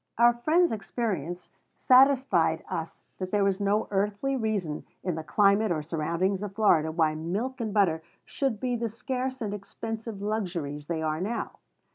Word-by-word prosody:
Our 240 +1 +6
friend's 315 +9 +2
experience 190 - -3 0.2
satisfied 255 - +4
us 165 0 -5 0.2
that 185 -1 -3
there 205 +1 +2
was 195 0 +1
no 205 +2 +1
earthly 205 +7 0
reason 205 - -2 0.2
in 180 - -1
the 160 - -4
climate 200 +5 +3
or 155 -3 -1
surroundings 170 +5 -1
of 205 -2 -5
Florida 170 -8 +3
why 160 -1 +2
milk 205 - -3
and 220 -2 -2
butter 190 -6 +2 0.2
should 265 -7 -2
be 250 0 -1
the 230 -1 -2
scarce 260 +2 -3
and 205 -2 -3
expensive 220 +1 -6
luxuries 175 -9 -3
they 160 -2 -2
are 155 +1 -1
now. 220 +5 -3
200 Hz, 160 wpm, -28 LUFS, 170-230 Hz, 0.2 s, Our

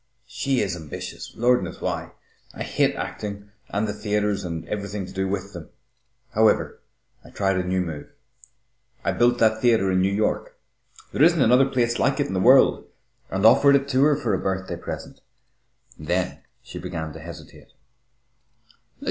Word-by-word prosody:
She 135 -3 -1
is 95 -4 -1
ambitious 80 -4 -8
Lord 125 +2 +3
knows - - -7
why! - - -4 0.4
I - - -4
hate - - +1
acting 100 -1 -6 0.2
and 105 +2 -1
the 105 - -2
theatres 105 -1 -1
and 85 -2 -5
everything 100 -1 -4
to - - -11
do 95 0 -1
with 100 +1 -4
them. 85 -3 -9 0.6
However, - - +2 0.4
I - - -15
tried 95 -1 0
a 90 - 0
new 90 +1 0
move. 80 -5 -6 1.0
I - - +2
built 120 0 +3
that 110 -1 +2
theatre 110 -6 +3
in 95 0 +2
New 95 +1 +2
York 105 +2 -1 0.5
there - - -2
isn't 170 +2 +5
another 130 +1 +5
place 120 -2 0
like 135 +1 +1
it 145 - +2
in - - -5
the 95 - 0
world 130 +6 +5 0.4
and 95 +2 -1
offered 140 +5 +7
it 140 0 +1
to 130 -1 +2
her 150 -1 +4
for 120 -7 -1
a 95 - 0
birthday 95 0 -3
present. - - -8 0.8
Then 90 +4 -2 0.2
she - - -9
began 80 -4 -5
to 80 - -9
hesitate." 80 -1 -12
100 Hz, 170 wpm, -24 LUFS, 95-120 Hz, 1.0 s, offered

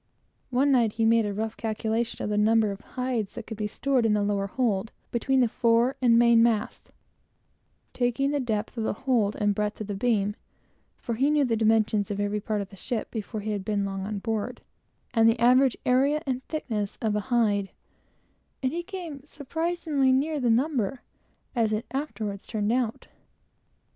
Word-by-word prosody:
One 265 +3 +2
night, 235 -5 +3
he 225 0 0
made 225 -1 +4
a - - -2
rough 220 +2 -3
calculation 225 +1 -2
of 210 - -2
the - - 0
number 215 0 +3
of 200 +2 -7
hides 250 -6 -3
that - - -6
could 220 - -7
be 210 -1 -1
stowed 265 +3 0
in 220 -2 +3
the 210 -1 +2
lower 200 -1 0
hold, 220 -2 -1 0.2
between 260 +2 +2
the 245 - +4
fore 235 +3 +2
and 235 -2 +5
main 235 -1 +6
masts, 230 -2 0 1.0
taking 250 +3 0
the 290 - 0
depth 225 -2 -2
of 220 -1 -1
hold 230 -6 +1
and 205 -1 +1
breadth 210 +1 -2
of 205 -2 -4
beam, 210 -3 +1 0.6
(for 235 - -4
he 250 +5 +1
always 300 - +2
knew 290 -2 +3
the 235 -3 +1
dimension 220 -1 +3
of 205 -1 -3
every 205 +1 0
part 210 0 -1
of 200 - -7
the - - -11
ship, 225 +4 -4
before 215 -1 -4
he 215 +1 -3
had 205 -2 -3
been 205 0 -1
a - - 0
month 195 0 -3
on 210 -1 -3
board,) 225 +3 -3 0.5
and 225 -1 +5
the 230 +1 +1
average 250 +2 +4
area 280 +5 +2
and 260 -2 -2
thickness 220 -10 -3
of 215 -2 0
a - - +1
hide; 210 -5 +2 0.9
he 300 +7 0
came 345 -7 -7
surprisingly 300 -1 -1
near 290 +4 +1
the 245 -3 +1
number, 255 0 +1 0.5
as 225 -3 +2
it 215 +1 -1
afterwards 220 -8 -4
turned 210 0 -1
out. 240 -2 -1
230 Hz, 190 wpm, -26 LUFS, 210-255 Hz, 1.0 s, main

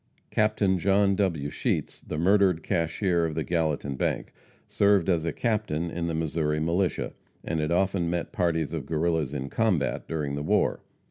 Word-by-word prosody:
Captain 105 -3 +2
John 100 +2 +3
W. 85 -8 0
Sheets, - - -2
the - - -5
murdered 95 -1 +3
cashier 85 0 0
of 80 -2 -1
the 80 - -1
Gallatin 75 -5 -1
bank, - - -2 0.3
served 100 -4 +3
as 85 -3 +2
a 85 - 0
captain 105 -7 -1
in 85 -1 -2
the 80 - -2
Missouri 80 -1 0
militia, 85 +3 0 0.3
and 80 - -2
had 75 +1 -1
often 90 -1 +1
met 85 0 -2
parties 80 -3 0
of - - -4
Guerrillas 80 -3 0
in 70 -2 -4
combat 95 -5 0
during 75 -3 -2
the 70 - -3
war. 75 - +1
85 Hz, 165 wpm, -27 LUFS, 80-95 Hz, 0.3 s, John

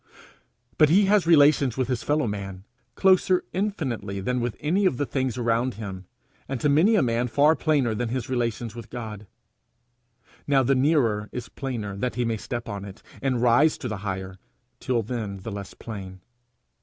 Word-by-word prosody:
But 155 -2 +6
he 195 +5 +5
has 200 -3 +3
relations 145 -6 +5
with 130 - 0
his 125 -3 -1
fellow 150 +2 +1
man, 100 -3 -5 0.3
closer 185 -1 +4
infinitely 135 - -2
than 125 +5 -1
with 120 -1 -3
any 185 +7 +2
of 130 - -1
the 145 - 0
things 130 -3 -2
around 120 0 0
him, 95 -3 -7 0.4
and 135 -2 -2
to 145 - +1
many 170 +11 +4
a - - +4
man 120 0 0
far 145 +7 +4
plainer 140 -5 +1
than 115 +2 -2
his 125 +1 -3
relations 120 -3 -2
with 115 -2 -9
God. 110 -4 -7 1.2
Now 135 -2 +4
the 135 +2 +3
nearer 130 -7 +2
is 125 -1 -6
plainer 115 -8 -5
that 125 +4 -2
he 120 -1 0
may 115 -1 -1
step 120 +3 -5
on 100 -3 -5
it, 100 0 -11 0.2
and 130 -3 0
rise 125 +6 +4
to 135 - -5
the 110 -3 -4
higher, 95 -1 -5 0.4
till 120 -3 0
then 105 -4 -5
the 115 - -5
less 100 -1 -7
plain. 95 -4 -8
120 Hz, 180 wpm, -25 LUFS, 105-140 Hz, 1.2 s, But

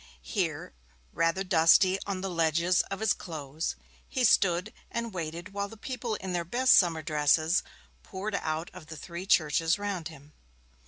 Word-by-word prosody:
Here, - - -3 0.4
rather 165 +3 +1
dusty 185 +2 +4
on 195 -2 -3
the 195 - -3
ledges 170 +1 +2
of 195 +2 -5
his 220 - +3
clothes, 155 -2 -5 0.3
he 255 - -1
stood 190 -3 +3 0.2
and 235 -2 -4
waited 170 +2 -5
while 200 0 -2
the 225 - -12
people 240 -1 -4
in 190 -3 -5
their 175 -1 0
best 245 +9 +3
summer 165 -4 +4
dresses 155 +3 +2 0.4
poured 200 +3 -6
out 160 -3 -2
of 175 -4 -12
the 160 - -9
three 175 +5 -7
churches 160 0 +3
round 200 -5 -3
him. 150 -2 -14
175 Hz, 160 wpm, -29 LUFS, 160-200 Hz, 0.4 s, dusty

